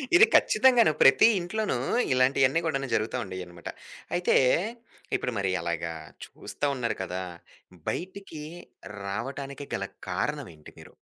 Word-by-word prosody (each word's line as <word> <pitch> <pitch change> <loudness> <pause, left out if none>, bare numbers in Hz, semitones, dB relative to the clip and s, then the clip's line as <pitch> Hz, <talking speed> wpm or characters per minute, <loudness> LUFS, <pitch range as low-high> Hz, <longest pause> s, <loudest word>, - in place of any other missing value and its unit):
ఇది 405 +5 +9
ఖచ్చితంగా. 255 -3 +5 0.2
ప్రతి 135 +10 +7
ఇంట్లోనూ 205 - -2 0.4
ఇలాంటియన్నీ 130 +3 +3
కూడా 135 -4 -1
జరుగుతూ 110 +3 -1
ఉండేయన్నమాట. 90 -2 -8 0.5
అయితే, 175 0 +2 0.8
ఇప్పుడు 125 - -3
మరి 95 -1 0
అలాగా, 85 -1 -3 0.3
చూస్తా - - -6
ఉన్నారు 115 -4 -2
కదా! 95 0 -4 0.7
బయటికి 185 -4 -6 0.6
రావటానికి 135 +7 -5
గల 100 - -3 0.2
కారణం 140 +9 -2
ఏంటి 75 - -15
మీరు? - - -14
130 Hz, 115 wpm, -27 LUFS, 95-160 Hz, 0.8 s, ఇది